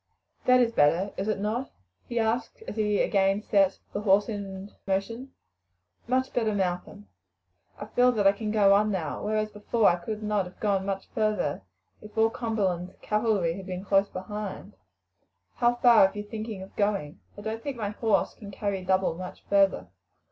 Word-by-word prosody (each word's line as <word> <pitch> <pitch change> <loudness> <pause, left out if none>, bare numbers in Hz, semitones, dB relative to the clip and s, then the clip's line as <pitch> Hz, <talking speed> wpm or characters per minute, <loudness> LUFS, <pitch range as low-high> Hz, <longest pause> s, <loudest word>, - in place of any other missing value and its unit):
"That 255 0 +6
is 235 -1 +2
better, 175 +3 +2
is 195 - -3
it 215 - 0
not?" 225 +6 -2 0.4
he 240 - -4
asked 230 - -1
as - - -5
he 210 -2 +1
again 195 +1 +2
set 195 -3 +3 0.2
the 205 - -2
horse 205 0 +3
in 200 -2 -6 0.2
motion. 230 +7 -2 0.8
"Much 260 +2 0
better, 220 -3 +1
Malcolm. 180 - -3 0.7
I - - -6
feel 245 +3 +3
that 210 -3 0
I 195 - +8
can 210 +2 -5
go 205 -2 +5
on 210 +2 +3
now, 170 -7 -3
whereas 215 0 -1
before 210 +2 +1
I 175 - +4
could 215 +5 -5
not 210 -2 0
have 180 - -13
gone 195 -2 0
much 195 -1 -3
further 215 - 0 0.4
if 210 +1 -13
all 225 0 +4
Cumberland's 195 -7 -2
cavalry 210 -6 +1
had 190 -1 -8
been 185 +1 -5
close 195 0 +3
behind. 205 +2 -6 0.8
How 240 0 +3
far 235 -5 +6
are - - -10
you 205 - -4
thinking 215 -2 -6
of 190 - -14
going? 200 -8 -1 0.2
I - - -7
don't 220 +2 -4
think 275 0 -5
my 210 -3 -2
horse 215 0 +1
can 205 - -11
carry 200 -1 -3
double 185 -1 +2
much 180 +2 -8
further. 195 - +3
205 Hz, 180 wpm, -27 LUFS, 195-220 Hz, 0.8 s, I